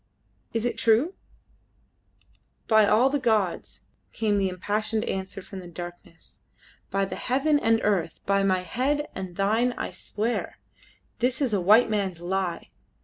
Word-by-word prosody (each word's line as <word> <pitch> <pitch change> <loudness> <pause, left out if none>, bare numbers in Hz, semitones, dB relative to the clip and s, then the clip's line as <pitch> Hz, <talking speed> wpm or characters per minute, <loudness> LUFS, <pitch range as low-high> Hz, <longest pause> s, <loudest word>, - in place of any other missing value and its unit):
Is 225 0 -1
it 235 -1 -2
true?" 230 - +3 1.5
"By 220 -2 +5
all 250 +6 +4
the 290 - +1
gods!" 220 -8 0 0.3
came 210 -2 +1
the 195 -1 +1
impassioned 215 +4 -1
answer 190 0 -4
from 195 0 -9
the 180 - -9
darkness 175 +1 -10 0.5
"by 195 0 +1
heaven 275 +9 +1
and 225 -3 +3
earth, 190 -6 0
by 200 0 +2
my 190 -2 +2
head 275 +9 -1
and 185 -2 -6
thine 220 +6 +2
I - - -3
swear: 225 +3 -3 0.6
this 250 +2 +1
is 265 -6 0
a 200 - +2
white 215 +5 +5
man's 195 -5 -1
lie. 180 0 -3
210 Hz, 145 wpm, -26 LUFS, 190-235 Hz, 1.5 s, By